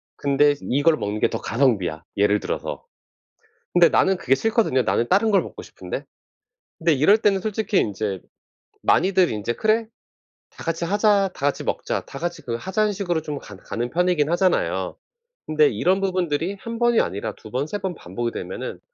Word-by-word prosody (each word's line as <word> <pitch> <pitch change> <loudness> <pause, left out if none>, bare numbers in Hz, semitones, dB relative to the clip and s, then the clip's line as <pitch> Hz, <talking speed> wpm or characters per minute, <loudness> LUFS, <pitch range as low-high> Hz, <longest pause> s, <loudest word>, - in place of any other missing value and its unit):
근데 145 +1 +3
이걸 145 +5 +2
먹는 105 -3 -3
게 - - +2
더 - - -3
가성비야.' 110 - +1
예를 105 +1 +3
들어서. - - -4 0.9
근데 175 -1 +6
나는 190 -1 +3
그게 130 - +1
싫거든요. 215 - +2
'나는 120 - 0
다른 205 - +3
걸 200 - +3
먹고 - - -9
싶은데.' - - -7 0.8
근데 165 0 +2
이럴 150 +9 +5
때는 205 -3 +2
솔직히 215 0 0
인제 100 -2 -1 0.6
많이들 185 -1 +3
인제 105 +2 -2
'그래. 220 +1 +1 0.6
다 - - -12
같이 165 +1 -2
하자. 200 0 +2
다 - - -15
같이 145 - 0
먹자. - - -2
다 135 - -9
같이 175 -1 -4
그 115 -3 -3
하자.'는 205 - 0
식으로 175 -5 -1
좀 150 -2 -5
간 100 - -12
가는 120 +5 -4
편이긴 175 -1 +1
하잖아요. 185 +1 +1 0.5
근데 155 -1 +4
이런 180 - +1
부분들이 180 -1 -1
1 230 0 -6
번이 240 -1 +4
아니라 105 +2 -3
2 110 - -13
번 130 +3 -1
3 205 - -4
번 185 -2 -3
반복이 115 +2 -4
되면은 - - -6
165 Hz, 340 characters per minute, -23 LUFS, 120-195 Hz, 0.9 s, 근데